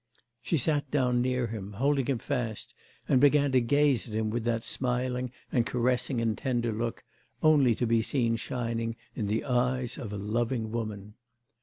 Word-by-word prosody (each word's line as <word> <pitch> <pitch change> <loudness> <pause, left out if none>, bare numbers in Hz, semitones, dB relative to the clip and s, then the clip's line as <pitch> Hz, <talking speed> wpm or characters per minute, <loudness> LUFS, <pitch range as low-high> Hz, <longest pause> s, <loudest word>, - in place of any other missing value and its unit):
She 125 +7 0
sat 145 +1 0
down 125 -4 +2
near 125 0 0
him, 105 -3 -6
holding 135 +3 +1
him 135 -3 +1
fast, 120 -4 -3 0.3
and 130 - +4
began 145 -1 +5
to 130 -1 +4
gaze 140 -3 +2
at 110 - -6
him 110 -1 0
with 120 0 -2
that 115 -1 0
smiling, 125 0 -1 0.2
and 120 - +3
caressing, 125 +1 0
and 115 -2 +1
tender 120 -3 -1
look, 115 +2 -3 0.4
only 145 -7 +5
to 120 - -1
be 115 0 +3
seen 115 0 0
shining 115 -1 -3 0.2
in 105 - -3
the 110 +2 0
eyes 125 0 0
of 115 -7 -6
a 105 - -4
loving 115 +2 -1
woman. 105 -3 -4
120 Hz, 175 wpm, -29 LUFS, 115-130 Hz, 0.4 s, began